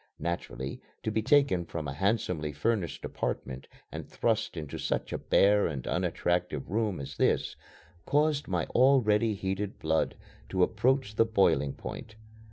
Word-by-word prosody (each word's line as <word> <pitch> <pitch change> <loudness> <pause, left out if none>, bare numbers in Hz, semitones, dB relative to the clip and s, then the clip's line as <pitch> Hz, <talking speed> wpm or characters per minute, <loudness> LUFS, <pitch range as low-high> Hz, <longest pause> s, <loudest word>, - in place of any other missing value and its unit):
Naturally, 85 -6 -4 0.2
to 110 - -1
be 110 - +1
taken 130 -7 +3
from 80 -2 -5
a 70 - -3
handsomely 90 -3 0
furnished 90 +4 -1
apartment 65 +1 -4 0.2
and - - -6
thrust - - 0
into 75 -3 -5
such - - -2
a - - -2
bare 100 +1 +4
and 70 -5 -5
unattractive 85 -4 -1
room 105 -5 0
as 70 - -7
this - - +1 0.5
caused 150 0 +2
my 90 -4 0
already 115 -5 +4
heated 95 +1 -3
blood 80 0 0 0.3
to 95 +5 +2
approach 115 +1 +1
the 115 - +5
boiling 85 -11 +2
point. 110 - -8
95 Hz, 145 wpm, -29 LUFS, 80-110 Hz, 0.5 s, the